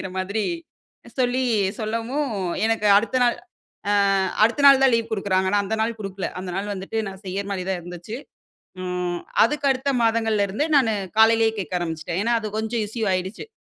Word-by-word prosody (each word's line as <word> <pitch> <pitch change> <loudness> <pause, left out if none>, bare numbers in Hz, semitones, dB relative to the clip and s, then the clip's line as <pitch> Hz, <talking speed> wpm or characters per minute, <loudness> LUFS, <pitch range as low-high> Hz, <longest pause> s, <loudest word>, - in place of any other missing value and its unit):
அப்டிங்கிற 190 - -5
மாதிரி 200 +3 -1 0.8
சொல்லி 255 0 +1 0.4
சொல்லவும். 230 +7 -2 0.4
எனக்கு 225 -2 0
அடுத்த 230 +4 -1
நாள் 240 - +2 0.6
அ - - +3 0.5
அடுத்த 235 +6 +2
நாள் 275 -1 +7
தான் 265 -2 +5
லீவ் 230 0 -2
குடுக்குறாங்க. 190 -2 0
நா 205 - +4
அந்த 220 +3 -1
நாள் 225 0 -1
குடுக்கல. 195 -2 -4
அந்த 185 - -6
நாள் 205 +2 -3
வந்துட்டு 195 +3 -5
நான் 190 0 -9
செய்யற 195 +2 -3
மாரி 190 -2 -2
தான் 190 -2 -1
இருந்துச்சு. 175 +5 -8 0.7
ம். 180 -1 -3 0.2
அதுக்கு 285 +4 0
அடுத்த 265 +1 0
மாதங்கள்ல 225 -2 +2
இருந்து 215 +10 -1
நானு 240 -5 +4 0.3
காலையிலேயே 225 0 +5
கேட்க 185 -4 -5
ஆரம்பிச்சிட்டேன். 165 0 -4
ஏனா, 235 - +1
அது 215 - -4
கொஞ்சம் 220 +1 -1
இஷ்யூ 220 +1 -3
ஆயிடுச்சு. 185 - -3
215 Hz, 170 wpm, -23 LUFS, 190-230 Hz, 0.8 s, நாள்